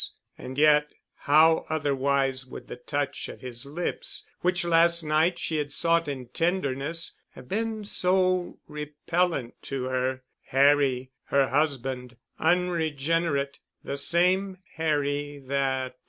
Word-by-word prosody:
And 130 +1 -8
yet 150 0 +4 0.2
how 155 +3 +4
otherwise 140 -3 +1
would - - -10
the - - -6
touch 145 +3 -3
of - - -10
his 125 0 -7
lips, 170 +5 -3
which 180 0 0
last 170 0 +4
night 155 +3 +2
she 160 - -2
had 145 -1 -2
sought 165 +2 +2
in 130 -4 -5
tenderness, 165 -2 -1 0.2
have - - -12
been 220 - -2
so 185 -2 +1
repellent 150 -2 -2
to 135 -2 -4
her? 130 0 -1 0.2
Harry—her 135 -1 +2
husband—unregenerate—the 145 +3 -1
same 185 +5 +2 0.2
Harry 145 -2 -1
that.... 130 -1 -1
145 Hz, 110 wpm, -27 LUFS, 135-170 Hz, 0.2 s, yet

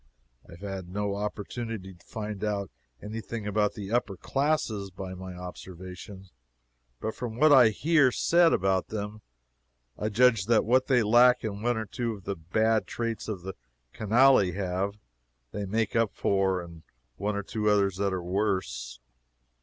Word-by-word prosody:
I - - -11
have 85 - -14
had 95 -3 -6
no 100 +1 -2
opportunity 105 0 -5
to 85 - -21
find 105 -2 -5
out 100 -4 -2 0.3
any 110 +2 -5
thing 110 0 -6
about 105 0 +1
the 100 -1 -6
upper 110 -5 0
classes 135 - -1
by 95 0 -7
my 95 0 -8
own 90 - -10
observation, 90 +1 -9 0.7
but 110 - -3
from 120 -3 -5
what 150 +4 +5
I 125 -5 +8
hear 145 +3 +3
said 170 +5 +4
about 95 0 +1
them 105 0 -5 0.8
I 105 - -1
judge 115 -2 +3
that 115 -1 +4
what 130 +3 +3
they 125 -3 +4
lack 125 +4 +5
in 105 -2 -4
one 120 +1 +1
or 110 - -2
two 115 +2 -3
of 100 -3 -11
the 100 - -3
bad 110 +7 +1
traits 115 -3 -3
the 95 -3 -5 0.4
canaille 110 -2 +4
have, 95 +1 -1 0.6
they 100 0 -4
make 110 +2 -1
up 115 -2 +2
in 95 -4 0 0.4
one 105 +1 -1
or 100 - -2
two 105 +1 -1
others 100 -3 +2
that 100 0 0
are 90 -2 -3
worse. 85 - -2
105 Hz, 165 wpm, -28 LUFS, 95-115 Hz, 0.8 s, I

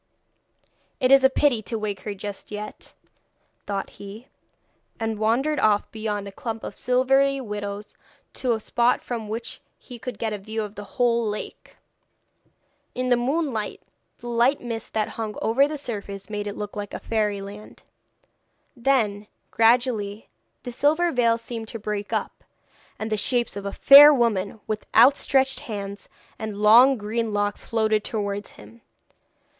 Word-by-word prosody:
'It 255 -1 +2
is 275 -1 +7
a 265 - +7
pity 265 -4 +2
to 225 +2 -4
wake 210 -3 -3
her 205 +1 -6
just 200 0 -8
yet,' 210 0 -8 0.7
thought 200 -1 -3
he, 205 +5 -10 0.7
and 225 -1 -2
wandered 255 +8 +1
off 210 -1 +2
beyond 210 -2 -3
a - - -7
clump 225 +2 -6
of - - -6
silvery 270 +2 +2
willows 205 -3 -6 0.4
to 250 -2 0
a 220 - -2
spot 240 +3 +1
from 225 -4 -5
which 230 +2 -6 0.2
he 245 -3 -12
could 245 -2 -6
get 220 0 -2
a 210 - -4
view 220 +2 -4
of 205 -1 -7
the 205 - -8
whole 235 -1 +3
lake. 210 -1 -6 1.2
In 255 0 -1
the 245 - +5
moonlight, 255 -3 -2 0.3
the 240 - -10
light 240 +4 +2
mist 230 -3 -6
that 215 -1 +1
hung 220 -2 -5
over 260 +6 +3
the 300 0 -5
surface 200 -6 -7
made 205 0 -3
it 205 - -5
look 210 -1 -6
like 205 -1 -5
fairyland. 210 -1 -3 0.9
Then 230 -5 +1 0.2
gradually 225 -3 +2 0.3
the 245 - -6
silver 310 +7 +2
veil 235 -3 +2
seemed 230 -1 -7
to 230 - -6
break 210 -1 -4
up, - - -3 0.5
and 220 0 -5
the 215 - +1
shapes 240 +2 -1
of 200 0 -5
fair 285 +2 +10
women 220 -6 0
with 215 -1 -4
outstretched 265 +2 +4
hands 200 -2 -7 0.3
and 215 -2 -5
long 235 +6 +6
green 220 +1 -2
locks 205 0 -1
floated 220 -2 +1
towards 205 -2 -3
him. 110 +2 -16
220 Hz, 150 wpm, -24 LUFS, 205-245 Hz, 1.2 s, fair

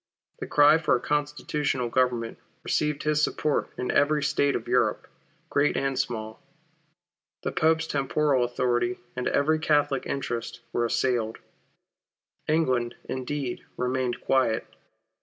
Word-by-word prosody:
The - - -5
cry 145 +2 +6
for 160 - +2
a - - 0
constitutional 145 -2 -1
Government 120 -2 0 0.2
received 150 -1 0
his 150 0 +2
support 150 -1 0
in 125 - -1
every 150 +1 +3
State 140 0 +2
of - - -4
Europe, - - +1 0.4
great 145 +1 +2
and 135 0 0
small. 110 -2 -3 1.0
The - - -1
Pope's 160 0 +2
temporal 140 -2 +1
authority, 120 0 0 0.2
and 125 - -2
every 155 +2 +2
Catholic 145 -3 +1
interest, 120 -4 -4
were 120 - +1
assailed. 115 -2 0 1.1
England, 130 -7 +1
indeed, 130 0 -3
remained 125 -1 -1
quiet. 130 -4 +1
135 Hz, 120 wpm, -26 LUFS, 120-150 Hz, 1.1 s, cry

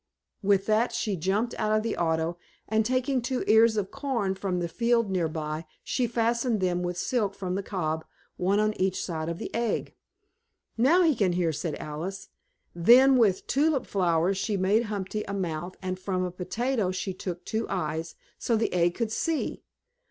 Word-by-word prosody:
With 200 -1 +3
that 220 +2 +2
she 220 -3 -1
jumped 195 +7 0
out 215 - +1
of 215 - -1
the 225 - -1
auto 165 0 0 0.3
and, 220 +1 +2
taking 255 +2 0
two 250 +1 -2
ears 220 0 +5
of 195 -2 -1
corn 260 -9 -1
from 190 -2 -2
a 175 - -1
field 230 +2 +1
nearby, 160 -3 -2 0.2
she 250 -2 0
fastened 235 0 +1
them 180 -1 0
with 175 0 -3
silk 205 -2 0
from 190 -2 -3
the 195 - -1
cob, 160 -5 -2 0.3
one 195 +3 +1
on 215 0 +2
each 190 0 +1
side 160 -2 -3
of 170 - -3
the - - -6
egg. 230 -1 -1 0.8
"Now 295 +11 +4
he 325 -3 +4
can 195 -5 +2
hear," 175 -2 +1
said 155 +1 -3
Alice. 175 +6 -6 0.4
Then 245 +10 +6
with 210 -7 +3
tulip 285 -1 +1
flowers 180 0 +1
she 205 0 -1
made 200 +5 +2
Humpty 210 0 -3
a 200 - -3
mouth 175 -1 -3
and 185 0 -3
from 185 -1 -1
a 180 - -2
potato 220 +4 -1
she 185 +1 -3
took 180 -1 -6
two 220 +1 -2
eyes, 160 -2 -3 0.2
so 235 - +1
the 220 0 0
egg 175 -1 +2
could 230 -3 -2
see. 325 +6 -1
195 Hz, 180 wpm, -27 LUFS, 180-230 Hz, 0.8 s, Then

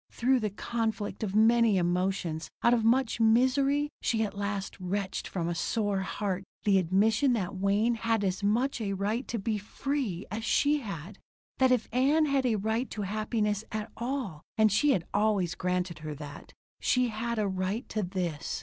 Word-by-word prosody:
Through 255 +2 +2
the 215 -2 -1
conflict 220 +1 -3
of 205 -2 -2
many 225 -1 +5
emotions, 175 -2 -1
out 235 - +5
of 235 -2 +2
much 235 +1 +2
misery, 270 +6 +3
she 225 -1 +1
at 200 -2 -4
last 200 -1 -3
wrenched 190 +1 -3
from 170 -3 -3
a 175 - -1
sore 205 +3 0
heart 190 0 -2 0.2
the 200 -2 +4
admission 210 - +3
that 200 -4 -2
Wayne 200 +5 +2
had 225 -1 0
as 190 0 -1
much 230 +5 +1
right 205 +4 -1
to 235 - -2
be 215 +1 -1
"free" 215 -3 -3
as 220 +2 -3
she 295 +6 +2
had. 195 - -7 0.4
That 260 -1 +5
if 245 -3 +2
Ann 285 +5 +3
had 275 -3 +1
a 230 - +2
right 220 +5 -1
to 210 - -4
happiness 210 +1 -1
at 215 0 -4
all 235 - -3 0.2
and 215 -1 +5
she 295 +9 +3
had 175 -8 -1
always 205 -5 +2
granted 180 -1 -2
her 155 -1 -6
that 145 -1 -10 0.3
she 250 -1 +2
had 230 +2 -3
a 210 -2 +1
right 190 +5 -2
to 215 - -1
this. 175 -5 -3
215 Hz, 175 wpm, -29 LUFS, 190-235 Hz, 0.4 s, many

